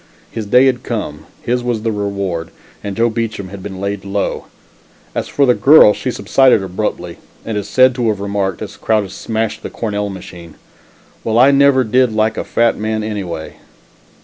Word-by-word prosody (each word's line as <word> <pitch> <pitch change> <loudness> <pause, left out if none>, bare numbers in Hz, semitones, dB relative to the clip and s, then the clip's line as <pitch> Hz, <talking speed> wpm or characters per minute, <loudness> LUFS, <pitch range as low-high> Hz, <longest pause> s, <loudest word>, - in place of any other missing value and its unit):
His 110 -2 -5
day 125 +5 +5
had 125 -2 +1
come, 105 -13 -5 0.2
his 125 +1 0
was 120 -3 -2
the 115 - 0
reward, 100 -5 -3 0.3
and 100 0 -5
Joe 115 +1 +3
Beacham 110 -4 -3
had 100 0 -9
been 95 -1 -7
laid 100 0 -3
low. 100 0 -2 0.7
As - - -3
for 140 - +2
the 125 - +4
girl, 135 -6 +7
she 130 - -4
subsided 125 -2 +3
abruptly, 95 +3 -4 0.3
and 110 - -3
is 105 -1 -3
said 130 0 +5
to 120 -2 -1
have 105 -3 0
remarked, 100 -2 -2
as - - -9
Crowdis 105 -4 0
smashed 110 -1 -3
the - - -6
Cornell 105 -2 -3
machine: 90 -3 -10 0.7
"Well, 110 0 0
I 130 +3 +6
never 140 -1 +4
did 125 +2 +2
like 110 +1 +1
a - - -3
fat 115 0 +1
man 110 0 -2
anyway!" 95 -7 -5
110 Hz, 180 wpm, -16 LUFS, 100-120 Hz, 0.7 s, girl